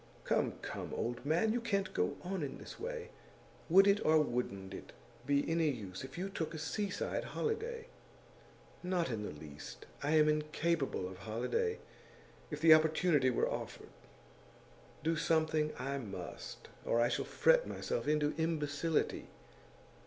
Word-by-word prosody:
'Come, -, -, +1 dB
come, -, -, -5 dB
old 120 Hz, +1 st, -2 dB
man, 170 Hz, +10 st, +2 dB
you 240 Hz, -, 0 dB
can't 200 Hz, -4 st, 0 dB
go 90 Hz, -, 0 dB
on 185 Hz, 0 st, -2 dB
in 140 Hz, -, -4 dB
this -, -, -10 dB
way. 480 Hz, 0 st, -4 dB, 0.6 s
Would 190 Hz, +4 st, +8 dB
it, 200 Hz, +1 st, +4 dB
or 155 Hz, 0 st, +5 dB
wouldn't 110 Hz, -9 st, -2 dB
it, -, -, -9 dB, 0.3 s
be 140 Hz, 0 st, +2 dB
any 165 Hz, -1 st, +2 dB
use 100 Hz, -8 st, -5 dB
if 130 Hz, +2 st, -8 dB
you 185 Hz, +2 st, -2 dB
took 165 Hz, -4 st, -3 dB
a -, -, -3 dB
seaside 190 Hz, +5 st, -2 dB
holiday?' 455 Hz, +1 st, -2 dB, 1.0 s
'Not 180 Hz, -3 st, 0 dB
the 115 Hz, -, -1 dB
least. 75 Hz, -7 st, -8 dB, 0.2 s
I 150 Hz, +3 st, +2 dB
am 155 Hz, -1 st, +6 dB
incapable 150 Hz, -, 0 dB
of 95 Hz, 0 st, -9 dB
holiday, 125 Hz, -, -1 dB, 0.7 s
if 150 Hz, -, -4 dB
the 160 Hz, -1 st, +9 dB
opportunity 155 Hz, -3 st, +4 dB
were 125 Hz, -, +2 dB
offered. -, -, -5 dB, 1.1 s
Do 165 Hz, +1 st, +2 dB
something 155 Hz, -1 st, +2 dB
I 140 Hz, +2 st, -2 dB
must, 100 Hz, -7 st, -7 dB, 0.2 s
or 115 Hz, -, +2 dB
I 120 Hz, -, +5 dB
shall -, -, -1 dB
fret -, -, +4 dB
myself -, -, -3 dB
into 150 Hz, 0 st, +2 dB
imbecility. 160 Hz, -1 st, 0 dB
155 Hz, 145 wpm, -34 LUFS, 130-180 Hz, 1.1 s, the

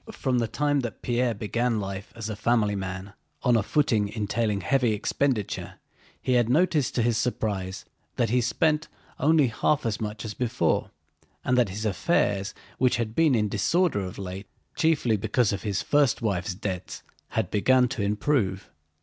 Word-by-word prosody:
From 130 Hz, -, 0 dB
the 115 Hz, -, 0 dB
time 145 Hz, +5 st, +1 dB
that 120 Hz, -6 st, -5 dB
Pierre 120 Hz, -1 st, +1 dB
began 115 Hz, +2 st, -1 dB
life 100 Hz, 0 st, -5 dB
as 110 Hz, -2 st, -5 dB
a 110 Hz, -, -4 dB
family 105 Hz, -1 st, +1 dB
man 95 Hz, 0 st, -5 dB, 0.3 s
on 125 Hz, -2 st, +4 dB
a 115 Hz, -, +4 dB
footing 110 Hz, -4 st, +1 dB
entailing 105 Hz, -1 st, -1 dB
heavy 125 Hz, +3 st, +2 dB
expenditure, 110 Hz, +1 st, -1 dB, 0.4 s
he 130 Hz, -, 0 dB
had 120 Hz, -2 st, +3 dB
noticed 150 Hz, -1 st, +2 dB
to 120 Hz, -, +2 dB
his 115 Hz, -1 st, +1 dB
surprise 100 Hz, -6 st, -2 dB, 0.3 s
that 115 Hz, -3 st, 0 dB
he 125 Hz, 0 st, +3 dB
spent 155 Hz, +5 st, +1 dB, 0.3 s
only 155 Hz, +1 st, +4 dB
half 145 Hz, +5 st, 0 dB
as 115 Hz, 0 st, -1 dB
much 105 Hz, +1 st, -4 dB
as 105 Hz, -, -4 dB
before, 125 Hz, 0 st, 0 dB, 0.6 s
and 125 Hz, -, +2 dB
that 125 Hz, -5 st, +3 dB
his 105 Hz, +4 st, -5 dB
affairs—which 105 Hz, -, 0 dB
had 115 Hz, -2 st, -2 dB
been 155 Hz, -1 st, +3 dB
in 105 Hz, -2 st, +2 dB
disorder 150 Hz, -, +1 dB
of 95 Hz, -2 st, -5 dB
late, 95 Hz, +1 st, -6 dB, 0.3 s
chiefly 145 Hz, -9 st, +2 dB
because 110 Hz, +2 st, +1 dB
of 100 Hz, -, -3 dB
his 100 Hz, 0 st, -2 dB
first 145 Hz, -4 st, +3 dB
wife's 100 Hz, -4 st, -1 dB
debts—had 95 Hz, -2 st, -5 dB
begun 125 Hz, +4 st, +4 dB
to -, -, -3 dB
improve. 100 Hz, -1 st, 0 dB
115 Hz, 165 wpm, -26 LUFS, 100-125 Hz, 0.6 s, on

